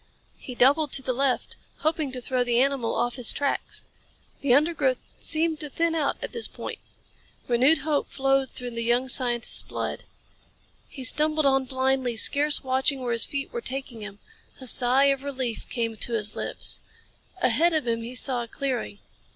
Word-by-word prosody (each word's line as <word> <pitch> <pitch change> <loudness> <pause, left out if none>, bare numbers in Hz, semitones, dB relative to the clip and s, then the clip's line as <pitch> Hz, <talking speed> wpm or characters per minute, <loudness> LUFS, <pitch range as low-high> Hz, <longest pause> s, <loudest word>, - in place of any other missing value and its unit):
He 250 - -8
doubled 285 +4 +4
to 270 - +1
the 255 - -1
left, 265 0 0 0.2
hoping 315 -3 0
to 255 - -4
throw 250 0 0
the 240 -1 +1
animal 270 -3 +1
off 240 +2 -1
his 245 -3 +5
tracks. 285 -1 -1 0.6
The 280 - +1
undergrowth 285 -2 +3 0.2
seemed 320 -1 -1
to 300 - -3
thin 330 +3 0
out 305 -4 0
at - - -4
this 465 - +1
point. - - -7 0.7
Renewed 255 +6 +4
hope 300 -2 0
flowed 270 -1 +1
through 245 -1 -7
the 230 0 -4
young 240 +2 +1
scientist's 240 -3 +3
blood. - - -5 0.8
He 265 - -9
stumbled 305 +3 +1
on 270 -1 +3
blindly, 260 -2 0
scarce 290 +5 +2
watching 265 +1 0
where 245 -2 -1
his 230 - +1
feet 280 +6 -4
were 475 - -3
taking 265 - -5
him. 205 -1 -8 0.4
A 260 - -8
sigh 255 +2 +4
of 270 - -7
relief 260 -5 -4
came 230 -2 -2
to 235 +2 -1
his 215 -2 0
lips. - - +1 0.6
Ahead 320 +6 +3
of 310 -3 +1
him 230 -1 -1
he 235 +2 -7
saw 250 -1 +2
a 235 - -6
clearing. 250 -5 -4
260 Hz, 175 wpm, -25 LUFS, 245-285 Hz, 0.8 s, his